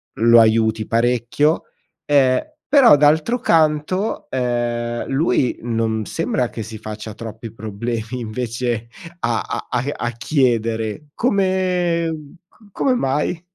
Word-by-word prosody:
lo 115 Hz, +2 st, +6 dB
aiuti 110 Hz, 0 st, +2 dB
parecchio. 120 Hz, +6 st, +1 dB, 0.4 s
Ehm, 135 Hz, -3 st, +3 dB, 0.3 s
però 275 Hz, -, +7 dB
d'altro 155 Hz, -, +3 dB
canto, 165 Hz, +2 st, +1 dB
ehm, 120 Hz, -2 st, -2 dB
lui 135 Hz, -3 st, +1 dB
non 115 Hz, -2 st, -1 dB
sembra 130 Hz, -5 st, -1 dB
che 115 Hz, -, -6 dB
si 110 Hz, 0 st, -8 dB
faccia 110 Hz, 0 st, -7 dB
troppi 110 Hz, 0 st, -8 dB
problemi 115 Hz, +2 st, -4 dB
invece 115 Hz, 0 st, -3 dB, 0.3 s
a 115 Hz, -5 st, 0 dB
a -, -, -5 dB
a 120 Hz, 0 st, -1 dB
a 120 Hz, -, -3 dB
chiedere 115 Hz, -1 st, 0 dB
come, 185 Hz, -6 st, +1 dB
mhmm, 155 Hz, -1 st, -9 dB, 0.3 s
c -, -, -24 dB
come 260 Hz, -2 st, +1 dB
mai? 150 Hz, -, -1 dB
120 Hz, 120 wpm, -20 LUFS, 115-155 Hz, 0.4 s, però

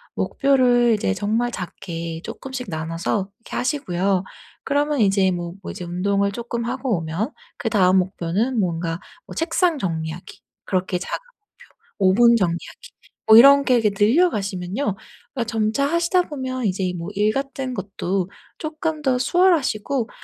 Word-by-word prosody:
목표를 245 Hz, -4 st, +3 dB
이제 95 Hz, -, 0 dB
정말 225 Hz, -, 0 dB
작게 170 Hz, -4 st, -6 dB
쪼끔씩 260 Hz, -3 st, -6 dB
나눠서 165 Hz, +5 st, -2 dB
이렇게 230 Hz, -, -7 dB
하시고요. 195 Hz, -, 0 dB, 0.4 s
그러면 290 Hz, -1 st, +1 dB
이제 195 Hz, -2 st, +3 dB
뭐 175 Hz, -1 st, -4 dB
뭐 -, -, -6 dB
이제 185 Hz, -, -7 dB
운동을 200 Hz, +3 st, 0 dB
쪼끔 235 Hz, +1 st, -4 dB
하고 245 Hz, -4 st, -1 dB
오면 170 Hz, -, -3 dB, 0.3 s
그다음 190 Hz, -3 st, +3 dB
목표는 190 Hz, +7 st, -1 dB
뭔가 170 Hz, -2 st, -1 dB, 0.3 s
뭐 -, -, -9 dB
책상 330 Hz, 0 st, +1 dB
정리하기 165 Hz, -1 st, -5 dB, 0.2 s
그렇게 185 Hz, -1 st, -1 dB
작은 -, -, -3 dB, 0.8 s
목표 190 Hz, -1 st, +5 dB
오븐 235 Hz, 0 st, +7 dB
정리하기 185 Hz, -, -2 dB, 0.4 s
뭐 220 Hz, 0 st, +9 dB
이런 280 Hz, +3 st, +8 dB
게 255 Hz, -, +4 dB
이렇게 225 Hz, -3 st, +3 dB
늘려 235 Hz, -, +4 dB
가시면요 195 Hz, +4 st, -3 dB, 0.5 s
그러니까 245 Hz, -4 st, -1 dB
점차 220 Hz, +5 st, +1 dB
하시다 340 Hz, +3 st, +2 dB
보면 260 Hz, -5 st, -4 dB
이제 190 Hz, -1 st, 0 dB
이 180 Hz, -1 st, -1 dB
뭐 170 Hz, +2 st, -5 dB
일 210 Hz, +2 st, +2 dB
같은 270 Hz, -1 st, -3 dB
것도 195 Hz, -2 st, -2 dB, 0.3 s
쪼끔 310 Hz, 0 st, -3 dB
더 260 Hz, -3 st, +2 dB
수월하시고 275 Hz, -, +2 dB
215 Hz, 325 characters per minute, -22 LUFS, 180-265 Hz, 0.8 s, 뭐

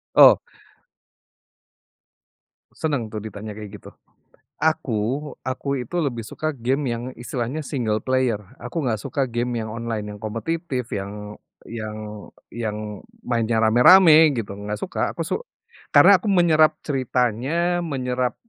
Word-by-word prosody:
Oh. -, -, +9 dB, 2.4 s
Senang 140 Hz, -9 st, -2 dB
tuh 105 Hz, -, -4 dB
ditanya 105 Hz, 0 st, -7 dB
kayak 105 Hz, -1 st, -9 dB
gitu. -, -, -13 dB, 0.7 s
Aku, 140 Hz, -2 st, 0 dB
aku 130 Hz, +2 st, -5 dB
itu 125 Hz, +8 st, -7 dB
lebih 130 Hz, -7 st, -1 dB
suka 155 Hz, +7 st, -4 dB
game 135 Hz, +3 st, -1 dB
yang 115 Hz, 0 st, -5 dB
istilahnya 125 Hz, +5 st, -4 dB
single 120 Hz, -7 st, -1 dB
player, 130 Hz, -2 st, +1 dB, 0.2 s
aku 125 Hz, +8 st, -4 dB
nggak 110 Hz, -4 st, 0 dB
suka 135 Hz, +4 st, -1 dB
game 120 Hz, +1 st, -2 dB
yang 110 Hz, -1 st, -4 dB
online 115 Hz, -2 st, -4 dB
yang -, -, -13 dB
kompetitif, 125 Hz, -, -3 dB
yang 105 Hz, +1 st, -6 dB, 0.3 s
yang 110 Hz, -2 st, -6 dB, 0.6 s
yang 105 Hz, -3 st, -4 dB, 0.2 s
mainnya 115 Hz, -2 st, 0 dB
rame-rame 155 Hz, +7 st, +7 dB
gitu, 110 Hz, -3 st, -3 dB
nggak 105 Hz, +1 st, -5 dB
suka 180 Hz, -, -5 dB, 0.2 s
aku -, -, -4 dB
su -, -, 0 dB, 0.6 s
karna 200 Hz, +2 st, +9 dB
aku 215 Hz, -, -5 dB
menyerap 165 Hz, -4 st, +4 dB
ceritanya, 135 Hz, +6 st, 0 dB
menyerap 125 Hz, -5 st, -2 dB
120 Hz, 125 wpm, -23 LUFS, 110-150 Hz, 2.4 s, Oh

